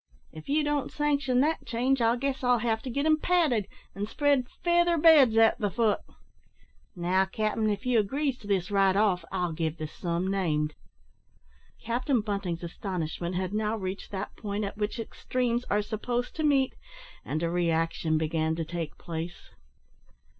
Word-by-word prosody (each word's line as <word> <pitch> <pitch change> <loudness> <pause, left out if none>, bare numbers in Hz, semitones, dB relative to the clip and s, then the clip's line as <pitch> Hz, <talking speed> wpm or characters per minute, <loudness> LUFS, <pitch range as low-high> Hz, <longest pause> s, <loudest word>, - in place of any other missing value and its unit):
If 155 - -11
you 300 +2 +2
don't 295 -2 -1
sanction 280 -4 +1
that 310 +3 +1
change, 245 +3 0
I 230 +1 +4
guess 270 +1 -2
I'll 245 -1 +4
have 225 -1 0
to 260 - -6
get 280 +4 -1
'em 310 0 +4
padded, 300 - +2 0.3
and 205 +2 -4
spread 285 -2 +2 0.2
feather 345 0 +3
beds 295 -8 +6
at 225 0 +5
the 205 - 0
foot. 215 +1 +1 1.0
Now, 185 +2 +2
cap'n, 215 +2 -1
if 205 +1 -2
you 250 -2 +3
agrees 265 +5 -1
to 205 - -12
this 190 -2 0
right 195 -1 +3
off, 195 -4 +2
I'll 180 -2 -1
give 160 0 -2
the 155 - -4
sum 170 +3 -3
named." 155 -6 0 1.1
Captain 245 +2 0
Bunting's 195 -5 -3
astonishment 175 -1 -4
had 185 +1 -2
now 215 +1 0
reached 190 -1 -5
that 195 0 -5
point 205 -1 -3
at 200 - -4
which 210 +3 -2
extremes 245 +1 -2
are 205 +1 +1
supposed 240 +3 -3
to 315 - -1
meet, 275 -3 +3 0.5
and 155 +2 -3
a 165 - +1
reaction 165 -2 +1
began 160 0 0
to 165 0 -3
take 165 -1 -5
place. 165 +1 -7
210 Hz, 170 wpm, -28 LUFS, 180-255 Hz, 1.1 s, beds